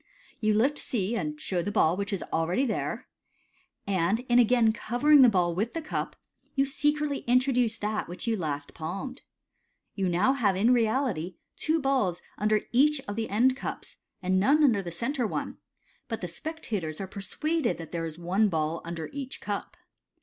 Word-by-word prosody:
M - - -41 0.3
You 215 -1 +2
lift 270 +7 +2
C, 220 -1 -1
and 150 -7 -3
show 180 +1 -1
the 205 - -3
ball 175 -5 +3
which 200 +2 -3
is 195 - -2
already 170 +11 +1
there; 225 - -3 0.8
and 195 +3 +1
in 245 -1 +3
again 235 -2 +4
covering 280 +7 +4
the 255 - +8
ball 180 -4 +2
with 215 - -2
the - - 0
cup, - - -3 0.4
you 275 0 +3
secretly 295 +1 0
introduce 250 -2 +3
that 210 +1 -2
which 175 - -6
you 230 -1 +1
last 145 -6 -4
palmed. 195 - -5 0.7
You 190 -3 0
now 185 +10 +3
have 225 -8 +2
in 225 +6 +4
reality 220 - 0 0.2
two 320 +1 0
balls 260 - +1 0.2
under 215 +1 +2
each 290 +4 +4
of 205 -7 -6
the 225 0 -2
end 250 +6 +3
cups, - - -7 0.3
and 185 +1 +2
none 285 +10 +4
under 230 -8 +4
the 180 - -6
centre 235 - -1
one; - - -4 0.5
but 225 -2 -4
the 180 - -3
spec 315 - -6
tators 160 -8 -3
are 195 - -3
persuaded 205 - -2
that 165 -2 -9
there 165 -1 -2
is 160 0 -8
one 190 +5 +2
ball 160 -1 -1
under 165 -1 -5
each 275 -2 -6
cup. 205 -1 -5
215 Hz, 185 wpm, -28 LUFS, 180-260 Hz, 0.8 s, the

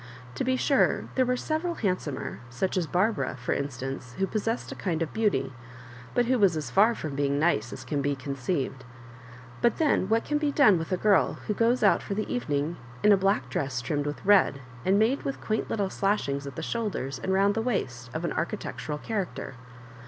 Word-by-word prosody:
To 130 - -2
be 260 +1 +2
sure, 275 +1 +2
there 255 -1 +2
were 250 0 +1
several 320 +5 -2
hand 185 - 0
somer, 145 -3 -5
such 125 +10 -2
as 180 -4 0
Barbara, 190 - 0
for 125 - -1
instance, 135 -2 -4
who 195 - +2
pos 210 +2 -3
sessed 230 +2 -1
a - - -3
kind 170 -4 -1
of 160 - -6
beauty, 190 -12 +1 0.6
but 245 - +3
who 255 +1 +2
was 190 -6 +4
as 145 -6 -4
far 220 - +5
from 155 -3 -5
being 140 0 +1
nice 145 -8 +1
as - - -8
can 145 -2 -1
be 140 +1 0
conceived; 135 0 -3 0.8
but 235 - +3
then 295 -11 +2
what 225 +1 +2
can 295 0 0
be 295 -1 +1
done 230 - +5
with 165 +3 -5
a 185 - +2
girl 205 0 +3
who 210 - 0
goes 235 +4 +2
out - - +5
for 200 - -4
the 215 - -2
evening 155 -7 -1 0.3
in 210 - +6
a - - +8
black 195 -9 +1
dress 130 0 -2
trimmed 145 +4 -2
with 145 - -5
red, 195 -8 +4 0.2
and 195 +2 +3
made 230 +6 +2
with 275 - -4
quaint 215 0 -2
little 200 -3 -1
slashings 140 -9 0
at 135 - -7
the - - -5
shoulders 205 - -3
and 190 - -2
round 195 +1 +3
the 225 - -1
waist 130 - -2
of 160 +5 -3
an - - -1
architectural 155 -2 -3
charac 200 +2 -3
ter - - -6
185 Hz, 215 wpm, -27 LUFS, 140-220 Hz, 0.8 s, a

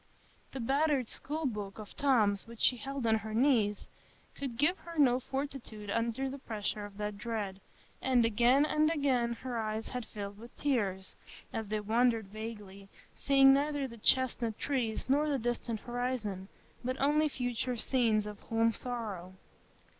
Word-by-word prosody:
The 265 - -4
battered 275 0 +1
school 310 +2 -3
book 210 -6 -3
of 215 -2 -9
Tom's 220 -9 +3
which 230 -1 -11
she 250 - +4
held 270 +2 -4
on 220 -1 +3
her 220 0 -5
knees 225 -5 +3 0.5
could 265 -5 -5
give 315 +8 +2
her 335 -1 -10
no 255 -4 +5
fortitude 260 -6 -5
under 230 +4 0
the 275 +1 -6
pressure 210 -3 -3
of 200 -1 -11
that 210 -1 -4
dread; 210 -4 -3 0.4
and 250 -3 +3
again 240 +6 +4
and 305 0 +3
again 265 -7 +1
her 245 0 -4
eyes 220 0 -3
had 250 -2 -5
filled 205 -1 -7
with 235 +2 -13
tears, 200 -9 -1 0.4
as 220 -1 -3
they 215 +1 -1
wandered 225 -1 +2
vaguely, 205 -2 -8 0.2
seeing 270 -1 +6
neither 285 0 +1
the 235 - -10
chestnut 235 -1 +2
trees, 245 -6 -1
nor 290 +3 +3
the 285 - +1
distant 235 -2 -2
horizon, 240 -6 -3 0.4
but 255 +1 -2
only 300 +2 +3
future 245 -1 -2
scenes 225 -3 +2
of 210 -1 -7
home 225 0 +1
sorrow. 210 -7 -4
235 Hz, 160 wpm, -32 LUFS, 215-270 Hz, 0.5 s, seeing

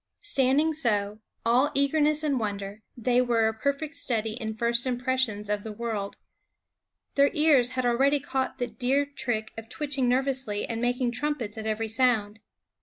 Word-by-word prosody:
Standing 295 -4 +2
so, 210 -8 +1 0.3
all 250 +5 +4
eagerness 300 +2 +2
and 285 -4 +1
wonder, 205 -1 -4 0.2
they 245 +1 +2
were 235 -3 +2
a 220 - 0
perfect 280 +6 -2
study 225 -6 -1
in 220 -2 -5
first 235 +2 +1
impressions 245 -4 0
of 210 0 -1
the 220 - -6
world. 210 -2 -4 1.0
Their 280 0 +4
ears 285 -5 +4
had 255 - 0
already 270 +4 +3
caught 265 -1 -2
the 245 - -1
deer 265 +3 0
trick 245 -6 -3
of 225 0 -12
twitching 270 -2 -1
nervously 260 -5 0
and 230 0 -4
making 245 0 0
trumpets 250 -4 -3
at 220 -1 -5
every 220 +1 -1
sound. 220 -3 +1
245 Hz, 160 wpm, -27 LUFS, 220-275 Hz, 1.0 s, all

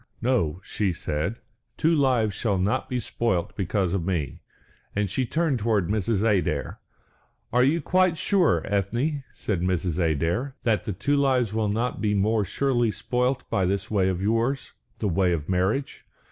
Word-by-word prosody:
"No," 110 -10 +1
she 100 -4 -1
said, 80 +6 -2 0.4
"two 165 +2 +3
lives 125 -7 +2
shall 105 -5 0
not 95 +3 0
be 125 - -1
spoilt 105 -6 -1
because 95 -2 0
of 95 -4 0
me," 85 -5 -2 0.5
and 105 0 +1
she 125 +7 -1
turned 155 -2 0
towards 105 -4 +1
Mrs. 105 0 0
Adair. 100 -6 0 0.7
"Are 125 +1 +5
you 155 +6 +2
quite 185 -1 +3
sure, 165 - +2
Ethne," 120 - -1
said 95 -5 -3
Mrs. 90 -1 0
Adair, 85 - 0
"that 110 -3 +1
the 105 - -2
two 140 +10 0
lives 130 -6 +2
will 110 -1 0
not 115 +4 -1
be 105 -1 +1
more 105 +2 +2
surely 120 +3 +1
spoilt 125 +4 -1
by 95 -2 +2
this 100 +2 -2
way 95 -3 +2
of 95 0 -2
yours 115 +6 0 0.3
the 105 - -1
way 90 0 +2
of 75 -3 -3
marriage? 95 +9 -1
105 Hz, 165 wpm, -25 LUFS, 95-125 Hz, 0.7 s, Are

